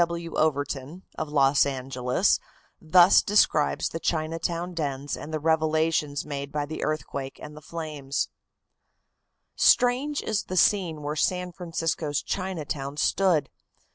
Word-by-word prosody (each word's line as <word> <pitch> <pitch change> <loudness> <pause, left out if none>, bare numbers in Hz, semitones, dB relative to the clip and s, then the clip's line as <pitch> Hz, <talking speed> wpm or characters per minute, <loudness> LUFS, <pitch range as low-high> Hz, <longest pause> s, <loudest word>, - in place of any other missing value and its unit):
W. 170 0 -4
W. - - 0
Overton, 145 +2 -2
of 155 - -4
Los 140 -1 +4
Angeles, 130 +4 0 0.4
thus 175 +3 +6
describes 200 -7 +2
the 165 - -5
Chinatown 165 +2 -2
dens 145 -3 -3
and 155 - -8
the 155 - -2
revelations 155 -2 +1
made 140 -1 -5
by 150 0 -2
the 155 +2 -5
earthquake 140 -3 -4
and 150 0 -10
the 150 - -11
flames: 150 -4 -4 1.3
"Strange 260 +4 +3
is 215 -2 -1
the 185 - -4
scene 170 -5 +2
where 150 +1 -3
San 180 +3 0
Francisco's 165 -4 -2
Chinatown 150 -7 -4
stood. 180 -1 +2
155 Hz, 130 wpm, -26 LUFS, 145-170 Hz, 1.3 s, thus